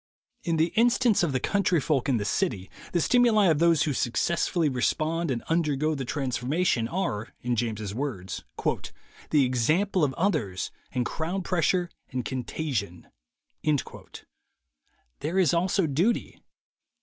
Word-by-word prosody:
In 165 -1 0
the 160 +2 +1
instance 235 -1 +4
of 170 -4 +1
the 130 - 0
country 185 +1 +1
folk 140 -2 0
in 130 - +3
the 100 - -2
city, 100 - -1 0.2
the 175 - +1
stimuli 230 +2 +4
of 155 -3 +2
those 170 -2 +4
who 150 - 0
successfully 165 +6 0
respond 155 +5 0
and 120 -3 -2
undergo 155 -2 +1
the 135 -3 -4
transformation, 130 0 0
are, 115 - -3
in 120 0 -1
James's 110 -3 -2
words, 110 -8 -4 0.9
"the 145 -3 +4
example 155 - +1
of 135 -2 +1
others, 150 - -1 0.2
and 125 -1 -1
crowd 175 +7 -3
pressure 180 0 +1 0.2
and 125 -1 -3
contagion." 125 - -4 2.1
There 165 +5 -2
is 180 -6 +4
also 180 +2 +2
duty. 165 - 0
155 Hz, 135 wpm, -27 LUFS, 125-175 Hz, 2.1 s, instance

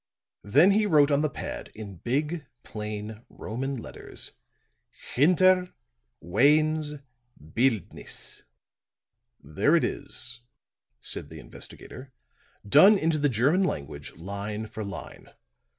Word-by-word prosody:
Then 145 - +5
he 210 +1 +3
wrote 150 -5 +5
on 140 0 +3
the 155 - +1
pad - - -7
in 105 -4 -8
big, 150 - -2 0.2
plain 105 +1 -6
Roman 135 +5 -4
letters: 115 - -6 0.8
HINTER 180 +5 +4 0.5
WAYNE'S 150 - +2 0.6
BILDNISSE 115 -6 -2 1.0
"There 75 - +2
it 170 - +3
is," 125 -3 -3 0.6
said - - +3
the - - -10
investigator, 130 +1 -8 0.6
"done 190 - +7
into 160 -3 +1
the 145 0 +2
German 135 - +2
language, 70 - -3
line 100 +6 -5
for 110 0 -7
line. 100 -1 -9
135 Hz, 105 wpm, -27 LUFS, 105-155 Hz, 1.0 s, done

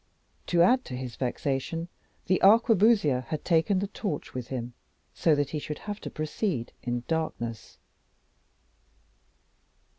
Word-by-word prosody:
To 170 -1 +4
add 255 +8 +4
to 125 - -6
his 125 -2 -6
vexation, 135 +6 -2 0.4
the 185 - +2
arquebusier 205 - +5
had 155 - -4
taken 170 +3 +3
the 200 +2 -1
torch 195 -6 -4
with 125 -1 -5
him, 120 -2 -5 0.4
so 160 -3 +3
that 145 -1 -1
he 155 - -2
should 150 0 -5
have 205 0 -6
to - - -5
proceed 155 - -2
in 120 -1 -2
darkness. 120 -9 -3
155 Hz, 130 wpm, -28 LUFS, 130-190 Hz, 0.4 s, arquebusier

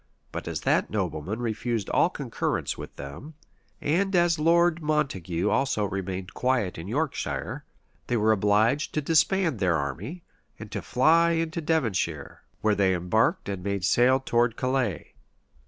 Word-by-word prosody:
But - - -6
as - - -3
that - - +1
nobleman 95 +1 -3
refused 115 -2 -2
all - - +4
concurrence - - -2
with - - -9
them, 100 - -9 0.4
and 190 +6 +1
as 175 -2 +3
Lord 170 +1 +3
Montague 105 - -1
also 120 -1 +1
remained 95 -1 -4
quiet 120 -10 0
in 85 - -7
Yorkshire, 145 +6 -3 0.4
they 120 - +1
were 110 0 +3
obliged 110 +7 +2
to 155 - +1
disband 160 - +2
their 90 -3 +2
army, 95 - -5 0.3
and - - -10
to - - -3
fly 165 +6 +3
into 165 0 -1
Devonshire, 115 - -1 0.2
where 110 -1 +3
they 95 -2 +2
embarked 110 - +1
and 100 -2 -4
made 100 -2 -1
sail 125 +6 +4
towards 120 -3 +1
Calais. 130 - -1
120 Hz, 145 wpm, -26 LUFS, 95-155 Hz, 0.4 s, all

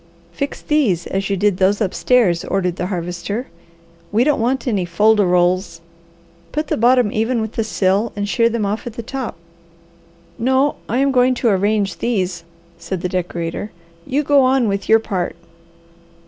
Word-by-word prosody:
"Fix 280 0 -4
these 230 - +1
as 195 +1 -2
you 200 - 0
did 200 -1 +1
those 195 +2 +2
upstairs," 205 -3 +2
ordered 180 -3 -1
the 180 - -2
Harvester. 180 +5 -4 0.7
"We 220 +3 +3
don't 295 +1 +2
want 260 +3 0
any 205 -6 +1
fol 190 +6 +3
de 210 - +2
rols. 180 -1 +1 0.7
Put 305 +1 -3
the - - +1
bottom 240 -1 +3
even 225 +3 0
with 220 -1 -3
the 225 - -1
sill 205 +1 0
and 205 0 -2
shear 230 +3 +2
them 230 -2 -1
off 210 +4 -3
at 235 - -6
the 235 - -6
top." 260 -4 -5 1.0
"No, 265 +4 +2
I 240 - 0
am 275 +1 +2
going 255 0 +3
to 240 -1 +1
arrange 200 -1 0
these," 185 -7 -1 0.4
said 190 -3 -4
the 180 - -2
decorator, 175 +1 -3 0.4
"you 285 +3 0
go 285 -1 +4
on 255 -2 +3
with 200 -1 -2
your 220 - +7
part." 195 -5 -3
210 Hz, 175 wpm, -19 LUFS, 185-245 Hz, 1.0 s, your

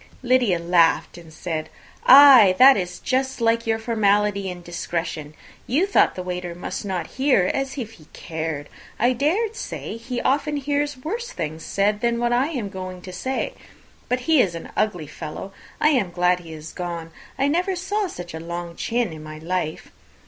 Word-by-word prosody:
Lydia 245 -7 +3
laughed, 170 -1 +2
and 170 -2 -13
said, 160 -1 -4 0.4
"Ay, 260 -8 +9
that 265 +1 +9
is 180 -2 -3
just 265 0 -1
like 230 0 +1
your 225 0 +2
formality 210 -3 +1
and 175 -1 -8
discretion. 165 -3 -4 0.3
You 295 +10 +2
thought 400 - +3
the 185 - -5
waiter 180 -1 -4
must 175 - -5
not 185 -4 -3 0.2
hear, 255 -10 +4
as 270 +1 -3
if 230 -5 -4
he 165 -9 -17
cared! 160 -3 -5 0.3
I 245 +3 +3
dare 360 - 0
say 335 - -6
he 245 +2 -4
often 290 +3 0
hears 290 0 -1
worse 455 - -4
things 155 - -5
said 205 +1 0
than 235 -1 +1
I 250 +3 +2
am 255 -11 -4
going 185 -2 -7
to 185 - -8
say. 260 +9 -3 0.6
But 250 0 0
he 305 +1 +4
is 175 -6 0
an 165 - -8
ugly 180 -7 0
fellow! 155 +6 -8 0.3
I 300 - +4
am 250 - +2
glad 180 +1 +2
he 165 -2 -11
is 155 0 -9
gone. 170 -2 -5 0.3
I 275 - +2
never 360 +6 +1
saw 390 +3 -1
such 175 - -8
a 160 - -5
long 170 +1 -6
chin 230 -4 -1
in 155 - -9
my 155 0 -9
life. 160 0 -3
200 Hz, 180 wpm, -23 LUFS, 175-265 Hz, 0.6 s, Ay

